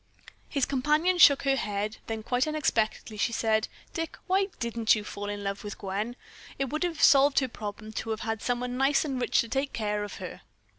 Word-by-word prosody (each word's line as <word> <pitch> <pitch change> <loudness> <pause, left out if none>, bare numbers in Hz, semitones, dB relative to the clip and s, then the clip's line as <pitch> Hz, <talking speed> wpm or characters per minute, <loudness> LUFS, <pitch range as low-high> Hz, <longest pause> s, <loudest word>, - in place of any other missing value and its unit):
His 280 -4 +1
companion 300 +7 +2
shook 280 -5 +7
her 275 -1 +3
head; 210 -3 -2
then 220 -1 -4
quite 250 +5 +1
unexpectedly 225 -8 -1
she 220 - +1
said: 220 -1 +1 0.3
"Dick, 330 -1 -4
why 385 +1 +2
didn't 230 -2 +2
you 210 - -4
fall 205 0 -6
in 205 0 -4
love 200 0 -3
with 205 -1 -6
Gwen? 205 +4 -3 0.4
It 270 -2 -2
would 305 - -2
have 345 -4 -1
solved 280 0 +6
her 260 - +4
problem 215 -2 -7
to 225 - -5
have 220 -1 -2
had 225 -1 -3
someone 245 0 -2
nice 275 +3 +3
and 265 -4 -2
rich - - +2
to 230 - -5
take 270 +4 -2
care 210 -2 -1
of 205 - -6
her." - - -8
235 Hz, 205 wpm, -28 LUFS, 215-280 Hz, 0.4 s, shook